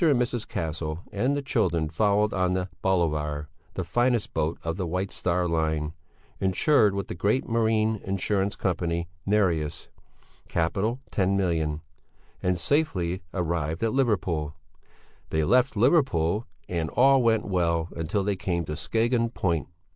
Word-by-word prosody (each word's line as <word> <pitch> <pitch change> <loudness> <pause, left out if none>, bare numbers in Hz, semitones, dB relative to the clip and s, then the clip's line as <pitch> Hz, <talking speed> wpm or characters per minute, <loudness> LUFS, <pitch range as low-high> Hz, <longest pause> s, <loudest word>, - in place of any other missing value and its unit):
and 145 -6 +4
Mrs. 120 -2 -1
Castle 80 -1 -3
and 130 +8 0
the 140 - -3
children 85 - +1
followed 105 +6 +2
on 90 -1 +1
the 90 0 -2
Bolivar, 75 -5 0 0.3
the - - -2
finest 120 -2 +1
boat 80 +2 0
of 80 0 -2
the 95 -2 -3
White 95 +3 -2
Star 90 0 0
Line, 80 -2 0 0.5
insured 100 +2 +3
with 100 - -3
the - - -4
great 100 +9 0
Marine 110 -2 +1
Insurance 100 +1 0
Company 85 -2 -1 0.2
"Nereus" 90 -8 +1 0.6
(Capital 95 +9 0
$10,000,000), 85 -6 +1 0.6
and 90 -1 +1
safely 95 - 0
arrived 85 -1 -2
at 115 - +1
Liverpool. 90 - 0 0.7
They 80 0 +1
left 125 - +3
Liverpool 110 - +2 0.2
and 85 -3 -2
all 135 - +5
went 115 -2 +2
well 85 -3 0
until 85 +5 -1
they 100 0 0
came 85 -2 -2
to 75 - -4
Skagen 115 +8 +1
Point. 85 - -1
95 Hz, 140 wpm, -26 LUFS, 80-110 Hz, 0.7 s, all